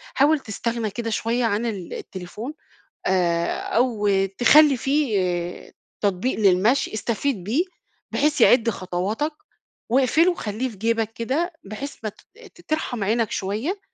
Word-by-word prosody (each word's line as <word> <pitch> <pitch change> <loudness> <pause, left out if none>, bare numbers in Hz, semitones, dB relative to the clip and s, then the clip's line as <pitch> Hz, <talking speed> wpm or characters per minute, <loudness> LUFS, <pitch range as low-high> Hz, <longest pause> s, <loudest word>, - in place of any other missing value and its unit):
حاول 295 +3 +4
تستغنى 230 -1 -3
كده 230 +2 -4
شوية 230 +2 0
عن 220 +1 0
التليفون، 200 - -6 0.5
آآ 170 -2 +1
أو 230 -4 0 0.3
تخلّي 290 +2 +6
فيه 200 - -1 0.3
تطبيق 200 +5 0
للمشي 210 +7 +3
استفيد 225 0 -1
بيه 240 - +1 0.5
بحيث 295 -2 +1
يعد 235 0 +6
خطواتَك، 205 - -2 0.6
واقفله 275 +8 +4
وخلّيه 235 - -3
في 215 - -12
جيبك 225 +1 0
كده، 290 +11 -1
بحيث 215 +9 -6
ما 215 - -1
ت - - -19 0.4
ت - - -16
ترحم 280 -8 -1
عينك 225 +2 +1
شوية، 220 - -2
230 Hz, 125 wpm, -23 LUFS, 200-270 Hz, 0.6 s, تخلّي